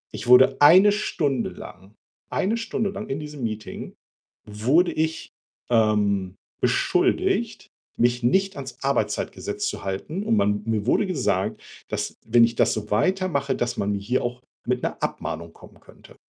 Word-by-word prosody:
Ich 120 - -7
wurde 125 +1 +6
1 185 +8 +8
Stunde 150 - -1
lang 95 +4 -12 0.3
1 215 +5 0
Stunde 225 -2 -2
lang 205 +2 -7
in 135 - -2
diesem 150 -4 -8
Meeting 110 -1 -5 0.5
wurde 125 - +2
ich, 160 +1 -3 0.4
ähm, 105 -5 +1 0.3
beschuldigt, - - +1 0.3
mich 120 0 +1
nicht 195 +10 +2
ans - - -8
Arbeitszeitgesetz 410 0 -2
zu - - -5
halten, 155 - -4
und 225 +1 +1
man 105 - +1
mir 110 0 -1
wurde 205 - +3
gesagt, 125 - -1 0.3
dass, - - -4
wenn 115 +1 +5
ich 115 0 +2
das - - +3
so 105 -1 -5
weitermache, 145 - +1
dass 120 0 -2
man 100 +1 0
hier 105 +6 -1
auch 120 +1 -4 0.2
mit - - -1
'ner - - -2
Abmahnung 85 +1 -4
kommen - - -17
könnte. - - -18
125 Hz, 150 wpm, -24 LUFS, -, 0.5 s, 1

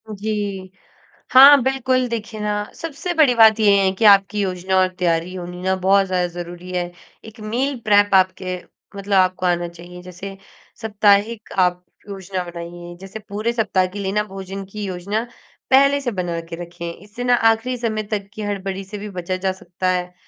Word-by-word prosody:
जी। 200 -2 -4 0.6
हाँ, 275 +1 +9
बिल्कुल, 260 -1 +1
देखिए 225 -1 -5
ना 210 0 -1
सबसे 330 +2 -5
बड़ी 295 -7 +4
बात 220 -1 +6
ये 210 -2 +5
है 190 - +2
कि 225 - +2
आपकी 200 0 +5
योजना 190 0 -1
और 185 0 +4
तैयारी 170 0 0
होनी 180 0 -7
ना 190 +1 +1
बहुत 195 +1 +3
ज़्यादा 180 -1 0
ज़रूरी 175 +1 -8
है। 175 -1 -2 0.3
एक 220 +1 -13
मील 250 +6 -2
प्रेप 205 -1 +4
आपके 185 -1 +1 0.4
मतलब 200 +1 -4
आपको 185 0 +2
आना 175 -1 +1
चाहिए। 175 +1 -12
जैसे 190 +2 -9 0.4
साप्ताहिक 215 +1 +1
आप 180 0 -2 0.3
योजना 190 -2 -5
बनाइए। 175 0 -9
जैसे 195 +3 -8
पूरे 215 +4 -2
सप्ताह 205 -5 +1
के 200 +3 -8
लिए 195 -1 -2
ना, 210 +1 +1
भोजन 195 -1 -7
की 210 -1 -6
योजना 195 +4 -3 0.5
पहले 275 +1 +5
से 245 -3 -2
बना 175 -3 -3
के 165 - -5
रखें। 170 0 -7
इससे 205 +7 -9
ना 245 0 +3 0.2
आख़िरी 235 +3 -1
समय 220 -2 -2
तक 200 -2 -2
की 215 - -7
हड़बड़ी 195 -2 -4
से 205 +2 -8
भी 210 +1 -7
बचा 185 -1 -4
जा 190 +1 -1
सकता 185 0 -4
है, 180 0 -2
195 Hz, 180 wpm, -20 LUFS, 180-220 Hz, 0.6 s, हाँ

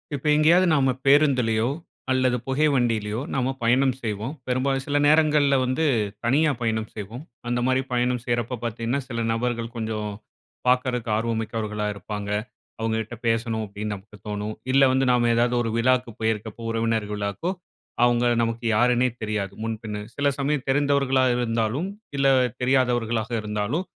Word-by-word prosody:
இப்போ 140 - -4
எங்கேயாவது 170 +5 +5
நாம 135 -3 +3
பேருந்திலயோ 130 -6 +4 0.4
அல்லது 130 -1 +2
புகை 135 +3 +2
வண்டிலயோ, 115 -4 0
நாம 130 0 0
பயணம் 130 +3 +3
செய்வோம். 110 +4 -3
பெரும்பாலும் 135 +1 0
சில 145 0 0
நேரங்கள்ல 150 -2 +4
வந்து 130 +5 0 0.4
தனியா 150 +6 +3
பயணம் 110 -1 -1
செய்வோம். 110 +4 -7 0.3
அந்த 120 0 0
மாரி 130 0 +2
பயணம் 125 0 +1
செய்றப்போ 120 0 -1
பார்த்தீங்கன்னா, 115 +3 -2
சில 115 -2 -3
நபர்கள் 115 0 -2
கொஞ்சம் 110 -2 -3 0.6
பார்க்குறதுக்கு 125 -2 +1
ஆர்வம் 115 0 -1
மிக்கவர்களா 105 -1 -3
இருப்பாங்க. 100 0 -6 0.5
அவுங்ககிட்ட 110 +1 -2
பேசணும், 115 -1 0
அப்டின்னு 105 +1 -4
நமக்கு 105 +2 -14
தோனும். 105 +1 -3 0.2
இல்ல 135 +1 +5
வந்து 130 +1 +2
நாம 120 -1 +3
ஏதாவது 120 +1 +2
ஒரு 115 -1 -2
விழாக்கு 125 0 +2
போயிருக்கப்போ, 110 0 -2
உறவினர் 115 -1 0
விழாக்கோ 105 - -2 0.5
அவங்க 120 0 +3 0.2
நமக்கு 115 +1 -2
யாருன்னே 125 +2 +3
தெரியாது, 105 -3 -2
முன்பின்னு. 110 -2 -4 0.2
சில 145 0 +1
சமயம் 140 -1 -1
தெரிந்தவர்களா 140 -1 +2
இருந்தாலும், 115 - -1 0.3
இல்ல 135 0 +3 0.3
தெரியாதவர்களாக 120 -3 +1
இருந்தாலும், 105 - -2
120 Hz, 140 wpm, -24 LUFS, 110-130 Hz, 0.6 s, எங்கேயாவது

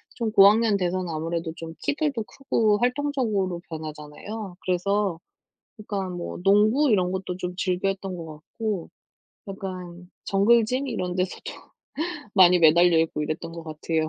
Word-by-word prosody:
좀 230 -3 -2
고학년 210 +1 +6
돼서는 180 -1 -1
아무래도 165 +1 -3
좀 165 0 -8
키들도 290 -6 -1
크고 215 -1 +1
활동적으로 245 -9 0
변하잖아요. 160 +6 -7
그래서 190 0 0 0.6
약간 195 -3 -4
뭐 175 - -5
농구 215 +8 +4
이런 185 -3 +2
것도 185 -1 -4
좀 180 -1 -4
즐겨했던 190 0 -1
것 165 -2 -7 0.3
같고 215 -6 -2 0.6
약간 180 -2 -7
정글짐 235 +6 +3
이런 180 -7 -3
데서도 185 0 -3 0.8
많이 180 -2 +7
매달려 170 +1 +6
있고 160 -2 -1
이랬던 155 +2 -4
것 165 -1 -8
같아요. 155 0 -2
185 Hz, 305 characters per minute, -25 LUFS, 170-215 Hz, 0.8 s, 많이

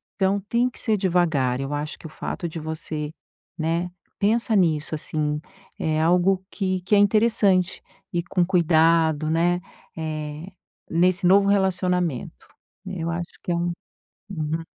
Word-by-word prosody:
então 195 0 +2
tem 240 +2 +2
que - - -14
ser 220 - +1
devagar, 165 -9 +1
eu 135 +2 -3
acho 150 +1 -4
que - - -14
o - - -12
fato 170 - -4
de 165 - -6
você 155 -1 -4 0.5
né, 170 +2 -1 0.3
pensa 225 +2 +2
nisso 160 -4 +2
assim, 150 -1 -2 0.4
é 155 0 0
algo 180 +3 +3
que 185 -2 -1
que 205 - +3
é - - +5
interessante 205 -3 +3 0.3
ir 170 -1 0
com 180 -2 +2
cuidado, 165 -3 +3
né, 175 +2 +2 0.4
eh, 155 0 -4 0.4
nesse 180 +2 +2
novo 200 +1 +5
relacionamento. 180 - 0 0.4
Eu 175 -3 -4
acho 170 0 -5
que - - -2
é 170 - +2
um 175 0 -1 0.6
Uhum. 160 -1 -2
170 Hz, 145 wpm, -24 LUFS, 155-190 Hz, 0.6 s, é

